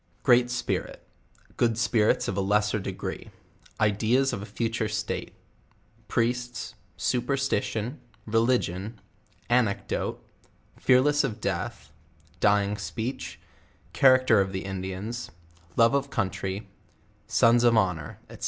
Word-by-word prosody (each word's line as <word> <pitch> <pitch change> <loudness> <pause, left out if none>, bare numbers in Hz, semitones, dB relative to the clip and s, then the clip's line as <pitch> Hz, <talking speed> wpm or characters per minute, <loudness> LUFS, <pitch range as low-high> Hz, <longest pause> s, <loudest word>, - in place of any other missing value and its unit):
Great 120 0 +5
Spirit 120 -1 -3 0.5
Good 115 -2 +2
Spirits 110 -2 +2
of - - -2
a 100 - 0
lesser 105 +2 +1
degree - - -5 0.5
Ideas 110 +6 +2
of 95 - -3
a 105 - -7
falure 115 -2 -2
Stale 105 0 -3 0.8
Priests 120 +2 -1 0.2
Superstition 125 - -1 0.3
Religion 110 -2 0 0.5
Anecdote 105 -5 0 0.5
Fearless 145 +3 +4
of 115 -6 -3
death - - -4 0.5
Dying 105 0 +2
speech 105 -5 -5 0.5
Character 130 -5 +5
of 95 0 -2
the 95 - -4
Indians 95 +5 -5 0.5
Love 115 0 +6
nf 140 0 0
Country 100 -2 -3 0.6
Sons 120 +1 +4
of 120 -1 +5
honor 90 -8 0
&c. - - -10
110 Hz, 105 wpm, -27 LUFS, 100-120 Hz, 0.8 s, Love